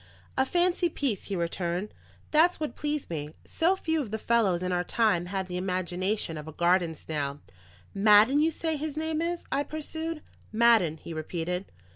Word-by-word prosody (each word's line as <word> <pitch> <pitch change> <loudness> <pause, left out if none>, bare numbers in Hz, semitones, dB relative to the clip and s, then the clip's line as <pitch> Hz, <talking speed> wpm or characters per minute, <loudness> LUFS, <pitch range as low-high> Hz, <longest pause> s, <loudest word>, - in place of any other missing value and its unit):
"A 265 0 +2
fancy 350 +1 +2
piece," 265 - -2
he 200 - -3
returned. 175 +3 -2 0.4
"That's 335 +4 +4
what 305 -1 -3
pleased 295 -7 -3
me. 150 -1 -5
So 345 +4 +2
few 320 -4 -1
of 245 - -5
the 220 - -2
fellows 210 -6 +2
in 185 - -1
our 180 0 +1
time 180 -5 +1
had 190 0 -2
the 180 0 -5
imagination 185 -1 -2
of 150 - -9
a - - -6
garden 175 0 +2
snail." 145 -2 -4 0.5
"Madden, 210 +7 +6
you 315 +2 +4
say 320 0 -2
his 300 0 -4
name 315 0 -1
is?" 340 +1 -2
I 280 - +2
pursued. 315 +1 -5 0.3
"Madden," 220 -8 +4
he 165 - -8
repeated. 170 +3 -3
210 Hz, 175 wpm, -28 LUFS, -, 0.5 s, Madden